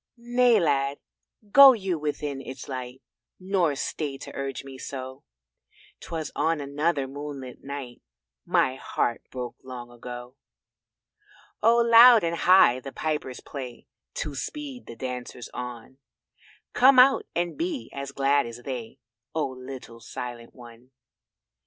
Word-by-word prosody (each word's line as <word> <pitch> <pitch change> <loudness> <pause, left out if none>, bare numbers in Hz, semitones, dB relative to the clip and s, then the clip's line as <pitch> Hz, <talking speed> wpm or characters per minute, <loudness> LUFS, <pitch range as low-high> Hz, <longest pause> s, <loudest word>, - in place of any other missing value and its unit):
"Nay, 240 -1 +3
Lad, 140 -4 +1 0.5
go 275 +1 +10
you 190 -7 -2
within 145 -2 -3
its 135 - -8
light, 130 -1 -6 0.4
Nor 185 -5 +1
stay 140 0 -3
to - - -10
urge 135 0 -4
me 135 -1 -10
so 130 0 -7 0.8
'Twas 160 -2 -5
on 160 +1 +1
another 145 0 -1
moonlit 140 -2 -8
night 135 -3 -7 0.4
My 130 0 +1
heart 120 -2 -1
broke 125 -2 -6
long 125 -2 -8
ago." 125 +2 -9 1.2
Oh 230 +2 +5
loud 235 -1 +8
and 170 0 0
high 175 -8 +5
the 135 +1 -8
pipers 150 -5 -3
play 130 -4 -8 0.3
To 150 - -3
speed 260 - -6
the 115 - -8
dancers 125 0 -6
on; 125 +1 -7 0.7
Come 260 +1 +6
out 265 +2 +6
and 175 0 -1
be 330 -4 -3
as 140 0 -5
glad 140 -1 +2
as 115 +1 -9
they, 125 -2 -6 0.4
Oh, 155 -4 0
little 130 -2 -9
Silent 120 0 -8
one. 120 0 -14
140 Hz, 130 wpm, -26 LUFS, 125-170 Hz, 1.2 s, go